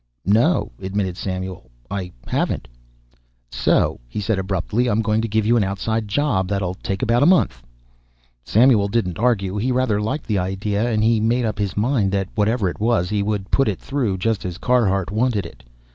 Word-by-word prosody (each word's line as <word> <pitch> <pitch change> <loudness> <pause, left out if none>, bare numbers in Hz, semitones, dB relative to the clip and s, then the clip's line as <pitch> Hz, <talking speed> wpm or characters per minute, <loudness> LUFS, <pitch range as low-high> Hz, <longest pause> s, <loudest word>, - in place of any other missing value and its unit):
"No," 115 - +2
admitted 95 -1 -2
Samuel; 95 -8 -5 0.2
"I 95 -3 -4
haven't." - - -1 0.8
"So," - - +1
he 105 - -4
said 105 0 0
abruptly 95 +5 -1
"I'm 115 -1 +1
going 110 +1 +1
to 115 - -2
give 110 0 0
you 115 +2 +3
an 110 - +3
outside 105 +3 -2
job 100 -4 0
that'll 95 -2 -1
take 95 +4 -4
about 120 0 +2
a 145 - +5
month." 145 - +3 0.8
Samuel 110 - +4
didn't 100 -4 -1
argue. 105 -5 +1
He 120 +5 0
rather 125 -5 +1
liked 125 +8 -3
the 105 -4 0
idea 100 +5 -1
and 110 -1 +1
he 115 0 +3
made 120 +3 +1
up 110 -1 -3
his 100 -2 -2
mind 110 -3 +1
that, 95 -1 -1
whatever 110 0 +1
it 90 - -4
was, 110 -5 +1
he 105 -1 +1
would 100 -1 -2
put 135 - +3
it 105 - -1
through 125 -9 -1
just 110 +2 -1
as 90 -2 -5
Carhart 100 -6 +1
wanted 110 -3 0
it. - - -12
105 Hz, 190 wpm, -21 LUFS, 95-115 Hz, 0.8 s, a